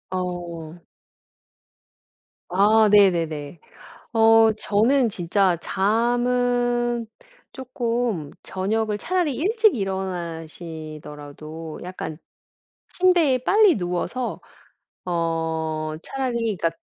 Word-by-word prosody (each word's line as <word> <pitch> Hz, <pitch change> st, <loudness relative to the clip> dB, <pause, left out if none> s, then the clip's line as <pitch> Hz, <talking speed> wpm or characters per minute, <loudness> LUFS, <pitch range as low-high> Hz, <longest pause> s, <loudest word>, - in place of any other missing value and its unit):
어. 175 Hz, -3 st, -5 dB, 1.7 s
아 210 Hz, +3 st, +5 dB
네네네. 165 Hz, -6 st, +2 dB, 0.5 s
어 225 Hz, 0 st, +6 dB
저는 230 Hz, +5 st, +2 dB
진짜 185 Hz, -1 st, +1 dB
잠은 240 Hz, +2 st, +1 dB, 0.5 s
쪼끔 235 Hz, -, -2 dB
저녁을 210 Hz, +3 st, -1 dB
차라리 345 Hz, -, -1 dB
일찍 430 Hz, -, +2 dB
일어나시더라도 160 Hz, -, -6 dB
약간 180 Hz, -4 st, -6 dB, 0.7 s
침대에 345 Hz, -8 st, +3 dB
빨리 400 Hz, -, +4 dB
누워서 180 Hz, +7 st, -3 dB, 0.6 s
어 160 Hz, -2 st, -2 dB
차라리 265 Hz, -2 st, -3 dB, 0.2 s
그러니까 165 Hz, -1 st, 0 dB
195 Hz, 165 characters per minute, -23 LUFS, 165-245 Hz, 1.7 s, 어